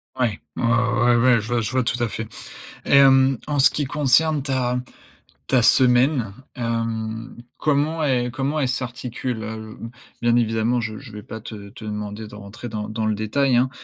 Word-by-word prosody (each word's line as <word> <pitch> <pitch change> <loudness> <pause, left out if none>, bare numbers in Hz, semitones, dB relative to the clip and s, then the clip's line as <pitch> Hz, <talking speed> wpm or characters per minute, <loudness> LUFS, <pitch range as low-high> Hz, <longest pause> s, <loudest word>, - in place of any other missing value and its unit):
Ouais. 120 -5 0 0.2
Ouais, - - -3
ouais, 120 0 +3
ouais, 125 +1 +5
ouais, 115 - +1
je 105 - -8
vois 120 -1 0
je 110 +2 -3
vois 130 -1 +1
tout 120 +1 -1
à - - +1
fait. 110 0 -5 0.6
Et - - +1
hem, 135 -1 +5
en 145 -1 0
ce 130 -1 +7
qui 145 - -2
concerne 145 +2 +2
ta 125 -2 0 0.7
ta 130 -2 +3
semaine, 125 -1 +4 0.2
hem, 115 -1 -3 0.2
comment 155 +2 +1
el 125 -3 +1
comment 140 +3 -1
elle 135 - +1
s'articule, 125 -2 -4
heu? 110 0 -7
B 115 - -6 0.3
bien 120 0 +3
évidemment, 115 +1 +1
je 110 -1 -4
je 130 -5 -11
vais 105 0 -8
pas 110 - -8
te 105 -2 -9
te 105 - -11
demander 105 0 -5
de 105 - -12
rentrer 105 +4 -9
dans 105 -2 -5
dans 110 0 -2
le 110 -1 +1
détail, 125 +5 +1
hein. 125 +2 +3
120 Hz, 195 wpm, -22 LUFS, 110-130 Hz, 0.7 s, ce